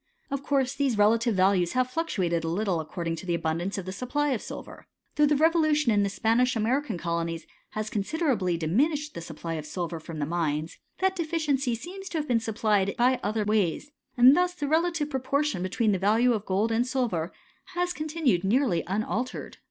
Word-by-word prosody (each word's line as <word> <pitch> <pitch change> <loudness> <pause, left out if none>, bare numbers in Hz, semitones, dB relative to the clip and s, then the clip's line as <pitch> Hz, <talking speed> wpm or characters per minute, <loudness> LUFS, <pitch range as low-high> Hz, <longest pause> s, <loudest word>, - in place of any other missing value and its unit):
Of 275 -1 -2
course 275 -2 +1
these 275 -5 0
relative 225 +2 +3
values 185 -2 +3
have 255 0 +1
fluctuated 185 - -1
a - - -2
little 180 +1 0
according 165 +1 -4
to 185 - -9
the 170 - +1
abundance 170 +4 -2
of 195 - -4
the 185 - -4
supply 255 +8 -1
of 255 -6 -1
silver. - - -9 0.3
Though 300 0 +4
the 300 - +3
revolution 310 -3 +3
in 205 -1 +3
the 200 - +1
Spanish 235 +5 +2
American 230 0 0
colonies 170 -1 -3 0.3
has 215 0 -3
con 210 - 0
1 - - -6
siderably 245 - 0
diminished 290 - 0
the 170 - -6
supply 165 0 -6
of 155 -2 -4
silver 170 0 -4
from 160 0 -8
th^ 145 -1 -2
mines, 160 -1 -2 0.2
that 380 0 +2
deficiency 305 -7 0
seems 380 - -8
to 335 - -3
have 300 -1 -2
been 240 -2 +2
supplied 210 -3 0
by 250 +1 +3
other 215 +1 -1
ways, 210 - 0 0.3
and 250 +3 +8
thus 360 0 +1
the 290 -4 -3
relative 320 -1 +1
proportion 275 -4 0
betweea 210 +4 +1
the 190 - 0
value 225 +6 +3
of 215 -2 -3
gold 200 +4 +1
and 235 +2 +1
silver 225 -11 -1 0.4
has 355 0 0
continued 305 - 0
nearly 205 - +2
un 200 +4 0
altered. 250 +3 -4
225 Hz, 200 wpm, -27 LUFS, 180-285 Hz, 0.4 s, and